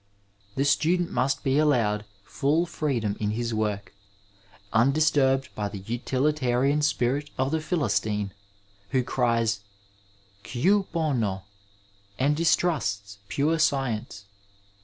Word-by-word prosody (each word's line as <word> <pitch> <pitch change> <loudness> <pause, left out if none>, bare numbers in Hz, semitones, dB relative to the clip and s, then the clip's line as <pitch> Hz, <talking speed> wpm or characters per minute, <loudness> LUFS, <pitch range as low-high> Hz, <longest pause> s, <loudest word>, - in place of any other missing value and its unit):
The 135 - +1
student 165 +4 +2
must 135 +1 0
be 135 +2 +2
allowed 115 -9 +2 0.2
full 150 - +1
freedom 120 -11 -1
in 105 - -1
his 120 -1 -2
work, 105 -2 -2 0.8
undisturbed 135 +1 +3
by 105 -1 -3
the 100 - -7
utilitarian 130 +3 +1
spirit 145 0 0
of 130 +1 0
the 160 0 0
Philistine, 105 - -1 0.6
who 130 -2 +1
cries, 115 -4 +1 0.8
Gut 190 - +1
bono 135 - 0
f 95 - -12 0.7
and 145 +3 +2
distrusts 100 - 0
pure 155 +3 +1
science. 120 -9 -1
130 Hz, 110 wpm, -26 LUFS, 110-150 Hz, 0.8 s, undisturbed